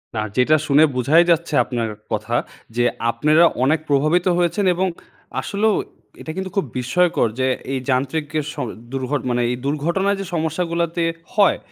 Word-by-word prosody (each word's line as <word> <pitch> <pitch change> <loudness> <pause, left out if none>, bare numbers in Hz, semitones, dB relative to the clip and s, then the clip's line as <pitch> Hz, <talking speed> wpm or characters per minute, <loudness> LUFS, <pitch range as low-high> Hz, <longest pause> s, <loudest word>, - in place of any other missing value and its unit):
না, 110 - 0 0.2
যেটা 130 +5 +4
শুনে 145 +2 +5
বোঝাই 145 +7 +4
যাচ্ছে 170 -1 0
আপনার 120 -3 -3 0.2
কথা 110 +2 -2 0.4
যে, 120 - +2 0.3
আপনেরা 150 +8 +4 0.2
অনেক 150 +4 +3
প্রভাবিত 155 +5 +2
হয়েছেন 180 +4 +1
এবং 190 +2 +1 0.5
আসলেও 210 +2 +1 0.5
এটা 160 - -6
কিন্তু 190 0 -3
খুব 195 - +1
বিস্ময়কর 145 +4 +2
যে 130 - +2 0.3
এই 135 - 0
যান্ত্রিক 135 +4 0
এ - - 0
স - - -10 0.4
দূর্ঘ 130 -2 -3
এ - - +3
মানে 120 0 +1
এই 125 - 0
দুর্ঘটনায় 170 +8 0
যে - - -5
সমস্যাগুলোতে 170 +1 -1 0.3
হয়। 205 -2 +4
155 Hz, 160 wpm, -21 LUFS, 130-175 Hz, 0.5 s, শুনে